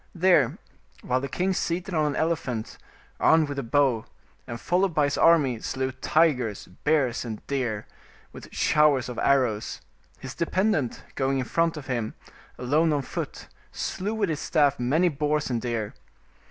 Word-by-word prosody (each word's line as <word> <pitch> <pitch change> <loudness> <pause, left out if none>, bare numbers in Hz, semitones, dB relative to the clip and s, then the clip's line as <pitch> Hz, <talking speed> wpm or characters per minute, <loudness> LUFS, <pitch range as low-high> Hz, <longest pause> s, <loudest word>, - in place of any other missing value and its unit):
There, 175 -8 +3 0.5
while 130 +1 0
the 140 - -3
king 185 +7 0
seated 180 +2 -2
on 155 -2 +2
an 145 - -2
elephant, 135 -9 -2 0.4
armed 160 -1 +4
with 145 -1 -4
a - - 0
bow, 125 -2 +1 0.4
and 120 -1 -6
followed 180 -1 +1
by 150 - +3
his 145 0 +1
army, 145 -8 +4
slew 130 +3 -2
tigers, 130 - +1 0.2
bears, 145 -6 +1
and 110 -3 -7
deer, 125 -7 -2 0.5
with - - -11
showers 145 -4 +3
of 125 - -5
arrows, 125 -6 +1 0.4
his - - -8
dependent, 170 - 0
going 135 0 0
in 130 - -1
front 165 +4 0
of 145 - -7
him, 120 -4 -3 0.4
alone 150 +6 +2
on 145 -2 0
foot, - - -6 0.2
slew 205 +4 -3
with 205 -4 0
his 155 -2 -2
staff 145 -4 +2
many 150 +9 +2
boars 150 -2 0
and 120 -2 -1
deer. 115 -4 -3
140 Hz, 160 wpm, -26 LUFS, 125-160 Hz, 0.5 s, armed